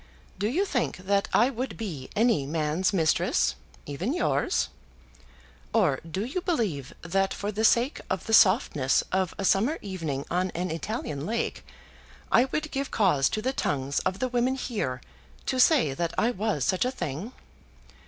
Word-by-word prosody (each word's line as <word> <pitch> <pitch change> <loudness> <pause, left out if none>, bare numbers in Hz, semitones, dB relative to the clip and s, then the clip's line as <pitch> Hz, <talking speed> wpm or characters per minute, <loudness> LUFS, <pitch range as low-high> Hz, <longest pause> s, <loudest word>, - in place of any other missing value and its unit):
Do 205 - +1
you 340 - +1
think 255 - -1
that 200 +2 0
I 245 +4 +4
would 255 +1 -4
be 165 -13 -5
any 220 - +2
man's 155 +4 0
mistress; 165 -6 +2 0.3
even 180 - -2
yours? 355 - +1 1.0
Or 180 -12 +3
do 185 +6 -4
you 315 +9 -3
believe 205 - -1
that 195 +3 0
for 205 +1 -3
the 215 +1 -2
sake 240 +5 +3
of 190 -2 -2
the 220 - -3
softness 185 - +4
of 185 -2 0
a 195 - -2
summer 230 - +3
evening 165 -9 -4
on 180 +2 +1
an 180 +1 -2
Italian 165 - -4
lake, 230 +1 -2 0.7
I 245 - +6
would 305 +3 -3
give 275 0 -2
cause 175 -11 +3
to 215 - -3
the 260 +2 0
tongues 140 - -1
of 185 - -1
the 255 - 0
women 250 +1 +1
here 205 - -3 0.4
to 260 - -1
say 255 - +5
that 170 +4 -2
I 235 - +3
was 210 - -1
such 185 - +2
a 250 - +1
thing? 190 - -5
200 Hz, 165 wpm, -27 LUFS, 160-245 Hz, 1.0 s, I